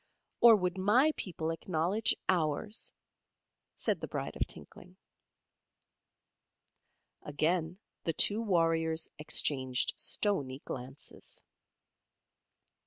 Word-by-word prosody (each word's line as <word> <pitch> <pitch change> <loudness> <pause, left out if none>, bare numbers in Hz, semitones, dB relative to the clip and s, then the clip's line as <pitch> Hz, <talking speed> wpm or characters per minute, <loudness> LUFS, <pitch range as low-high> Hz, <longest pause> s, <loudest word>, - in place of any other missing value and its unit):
"Or 235 -2 +9
would 180 -2 -1
my 240 +11 +4
people 165 -3 -3
acknowledge 175 +5 0
ours?" 175 +4 0 0.8
said - - -1
the - - -4
Bride - - -4
of - - -1
Tinkling. 180 +1 -9 2.2
Again 160 +3 -1 0.3
the 165 - 0
two 210 +7 +3
warriors 165 -5 +1
exchanged 130 -4 0
stoney 140 -10 -1
glances. 130 +2 -8
165 Hz, 85 wpm, -32 LUFS, 155-195 Hz, 2.2 s, Or